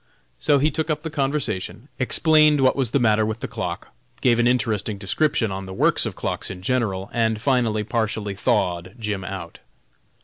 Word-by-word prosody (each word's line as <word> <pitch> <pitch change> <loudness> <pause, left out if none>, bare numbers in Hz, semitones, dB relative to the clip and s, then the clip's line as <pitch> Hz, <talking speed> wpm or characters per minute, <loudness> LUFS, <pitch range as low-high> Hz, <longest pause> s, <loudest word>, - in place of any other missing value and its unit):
So 140 - +3
he 150 +3 +2
took 160 +3 -2
up 155 0 -1
the 160 - -4
conversation, 135 -6 -2
explained 155 +2 +4
what 130 -1 +4
was 135 -4 +1
the 135 - +1
matter 110 -4 +3
with 110 +1 -3
the - - -3
clock, - - -5 0.3
gave 120 -2 +3
an 120 - +4
interesting 110 -4 0
description 110 +3 0
on 95 0 -5
the 95 - -7
works - - +2
of - - -6
clocks - - -3
in 90 -1 -8
general, 105 -5 -1
and 110 -2 +1
finally 115 -4 +1
partially 110 -2 -2
thawed 95 -4 -1
Jim 105 -4 -3
out. 95 -4 -7
115 Hz, 180 wpm, -23 LUFS, 100-135 Hz, 0.3 s, explained